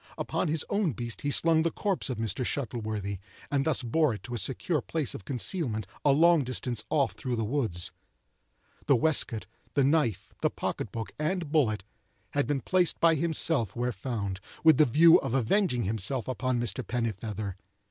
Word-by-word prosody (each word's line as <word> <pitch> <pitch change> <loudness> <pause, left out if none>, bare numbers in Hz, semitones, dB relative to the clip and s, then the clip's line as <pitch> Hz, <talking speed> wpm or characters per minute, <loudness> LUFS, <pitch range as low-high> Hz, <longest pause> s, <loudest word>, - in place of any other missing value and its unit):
Upon - - -1
his 155 0 0
own 200 -8 0
beast 120 +1 -4
he 145 - -1
slung 160 +2 +3
the 165 - +2
corpse 195 -2 -1
of 130 - -3
Mr. 115 +3 -1
Shuttleworthy, 110 -7 -3 0.3
and 140 -1 +1
thus 155 -4 0
bore 135 +1 +2
it - - -11
to 120 - -7
a 120 - -1
secure 140 - 0
place 155 -2 -2
of 95 - -9
concealment 125 - -1 0.2
a 145 - +5
long 165 +2 +5
distance 125 -3 -2
off 140 -3 +2
through 125 -2 -3
the 115 - -1
woods. 110 -9 -1 1.0
The 140 - +6
waistcoat, 125 -5 +2 0.3
the 140 - +4
knife, 140 - +1
the - - +3
pocket - - -4
book, 115 -1 -5
and 165 0 -1
bullet, 110 -11 +2 0.5
had 145 -1 0
been 145 -2 0
placed 180 +5 +1
by 165 -1 +5
himself 155 - 0
where 120 +1 0
found, 100 -3 -4 0.2
with 160 -4 +7
the 155 - +5
view 160 +7 +7
of 120 - -2
avenging 130 - +2
himself 110 +5 -1
upon 130 0 -1
Mr. 115 -6 -2
Pennifeather. 110 -4 -3
130 Hz, 180 wpm, -29 LUFS, 115-155 Hz, 1.0 s, with